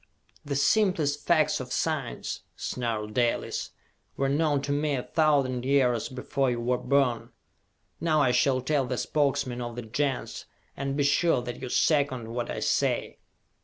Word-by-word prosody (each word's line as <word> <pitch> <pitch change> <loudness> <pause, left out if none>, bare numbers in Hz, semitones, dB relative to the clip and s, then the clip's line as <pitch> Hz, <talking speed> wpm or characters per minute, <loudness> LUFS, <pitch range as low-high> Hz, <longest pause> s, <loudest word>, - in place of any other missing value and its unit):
"The 140 -1 -3
simplest 150 -3 +2
facts 155 -3 +3
of 130 -1 -7
science," 150 -6 -2 0.2
snarled 110 -4 -3
Dalis, 120 0 0 0.5
"were 135 0 +1
known 145 0 +2
to 140 - -2
me 145 0 +1
a 125 - -3
thousand 140 -6 +1
years 130 -4 +2
before 130 +1 -1
you 120 -1 -1
were 125 +1 0
born! 135 -5 +1 0.7
Now 160 -2 +2
I 135 -4 +4
shall 130 +1 +2
tell 140 +1 +1
the 125 0 -2
Spokesmen 135 -4 0
of 120 -1 -5
the 120 - -5
Gens, 135 +4 -2 0.3
and 140 0 -3
be 145 - +2
sure 145 -1 +2
that 120 0 -6
you 130 - -5
second 135 -6 +1
what 120 0 -3
I - - -4
say!" - - 0
135 Hz, 160 wpm, -27 LUFS, 125-145 Hz, 0.7 s, I